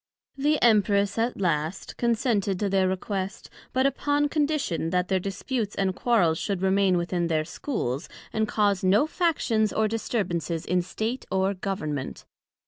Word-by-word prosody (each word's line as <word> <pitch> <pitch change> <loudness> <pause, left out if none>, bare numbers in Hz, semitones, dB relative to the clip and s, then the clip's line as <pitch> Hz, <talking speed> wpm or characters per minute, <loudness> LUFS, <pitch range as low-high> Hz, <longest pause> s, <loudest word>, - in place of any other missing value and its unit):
The 295 +2 +1
Empress 205 -2 +3
at 235 0 0
last 165 -1 -1
consented 225 -5 0
to 205 - 0
their 190 -1 +2
request, 190 +1 -3 0.2
but 260 +1 +1
upon 290 +2 +1
condition, 285 - 0
that 180 +1 0
their 190 -1 +2
disputes 205 +3 -3
and 190 -1 0
quarrels 185 -10 +2
should 195 -3 -2
remain 190 -1 +3
within 175 0 -1
their 155 -2 0
Schools, 155 - -3 0.2
and 220 0 +1
cause 205 -3 +1
no 195 +8 +4
factions 295 - +1
or 220 0 +1
disturbances 175 - -2
in 180 0 +1
State, 220 +8 -4
or 190 +1 +1
Government. 155 -8 -4
200 Hz, 145 wpm, -26 LUFS, 180-230 Hz, 0.2 s, no